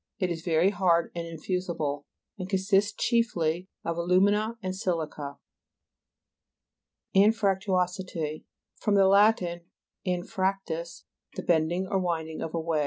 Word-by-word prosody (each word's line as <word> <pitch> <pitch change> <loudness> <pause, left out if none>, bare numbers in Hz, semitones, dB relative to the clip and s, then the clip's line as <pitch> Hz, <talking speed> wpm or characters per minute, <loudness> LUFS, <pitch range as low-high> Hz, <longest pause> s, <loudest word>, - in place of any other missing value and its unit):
It 185 -3 -1
is 165 -1 -3
very 170 +3 +3
hard 175 -4 +2
and 170 -1 -4
infusible, 165 -3 -3 0.3
and 185 0 -5
consists 195 +1 +2
chiefly 185 -8 0 0.2
of 170 0 -2
alu'mina 205 +6 +2
and 185 0 -2
si'lica. 155 -6 -3 1.8
AXFRACTUO'SITY 190 -5 +1 0.3
Fr. 210 - -1
Lat. 200 +2 +5 0.7
anfrac 185 +2 0
tus, 165 +1 -6 0.3
the - - -4
bending 170 +2 +1
or 195 0 0
winding 160 -3 -2
of 165 - -4
a - - 0
way. 160 -1 0
180 Hz, 115 wpm, -28 LUFS, 165-195 Hz, 1.8 s, Lat